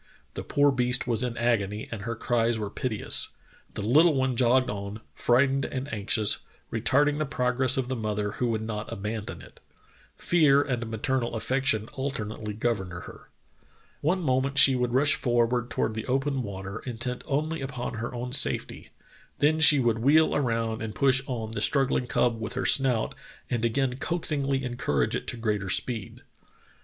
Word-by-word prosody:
The - - -5
poor 145 0 +2
beast 125 -1 +1
was 115 -2 +1
in 125 -2 -3
agony 110 -3 0
and 115 -3 -5
her 115 +3 -4
cries 115 0 0
were 105 -2 -4
piteous. 110 -3 -1 0.4
The 105 - -4
little 150 +8 +4
one 130 -1 0
jogged 125 +2 +3
on, 100 +1 -5
frightened 135 +2 +2
and 135 0 -5
anxious, 105 0 0 0.3
retarding 145 +6 +2
the 155 - 0
progress 130 -1 +1
of 130 -2 -1
the 130 - -2
mother 105 -2 -2
who 125 - -2
would 110 -1 -1
not 105 -1 -5
abandon 105 +1 -5
it. - - -16 0.6
Fear 145 -5 +4
and 120 -4 -3
maternal 120 +2 -2
affection 115 -1 0
alternately 110 -6 -4
governed 105 -5 -2
her. 90 - -10 0.7
One 180 +5 +1
moment 135 0 0
she 135 -1 +8
would 125 -1 -1
rush 140 +2 +4
forward 120 0 0
toward 110 - -1
the 110 0 -5
open 135 +1 0
water, 100 -1 -6
intent 125 +1 -4
only 155 +2 -1
upon 130 -2 -5
her 120 - -4
own 125 +1 -5
safety; - - +2 0.5
then 150 +3 +2
she 150 -2 +8
would 115 -3 +1
wheel 150 +6 +4
around 115 -4 -1
and 110 -2 -5
push 135 +4 +3
on 115 -4 -4
the 115 - -4
struggling 135 -3 +2
cub 115 -2 0
with 110 +1 -5
her - - -3
snout 130 -5 +3 0.4
and 120 -2 -1
again 125 +2 0
coaxingly 140 -4 -1
encourage 120 - -1
it - - -4
to - - -3
greater 105 -4 -2
speed. 115 +2 -3
125 Hz, 170 wpm, -27 LUFS, 110-135 Hz, 0.7 s, she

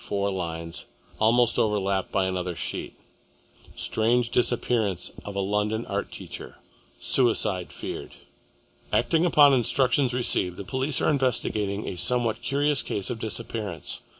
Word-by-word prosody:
Four 100 0 -1
lines, 85 -3 -5 0.3
almost 115 +2 +3
overlapped 100 -3 0
by 95 -2 +1
another 90 -1 -2
sheet - - -5 0.8
STRANGE 120 +2 +1
DISAPPEARANCE 115 -6 +1
OF 100 - -6
A - - -1
LONDON 105 +3 0
ART - - -3
TEACHER - - -8 0.4
SUICIDE 110 -8 +1
FEARED - - -6 0.8
Acting 165 +2 +2
upon 145 -4 +6
instructions 125 +1 +3
received, 95 -7 +1
the - - -5
police 130 +7 0
are - - +3
investigating 110 -7 0
a 90 - -4
somewhat 120 +2 0
curious 145 +3 +1
case 100 +3 -3
of 115 - -4
disappearance. 110 -6 -3
110 Hz, 125 wpm, -26 LUFS, 100-125 Hz, 0.8 s, upon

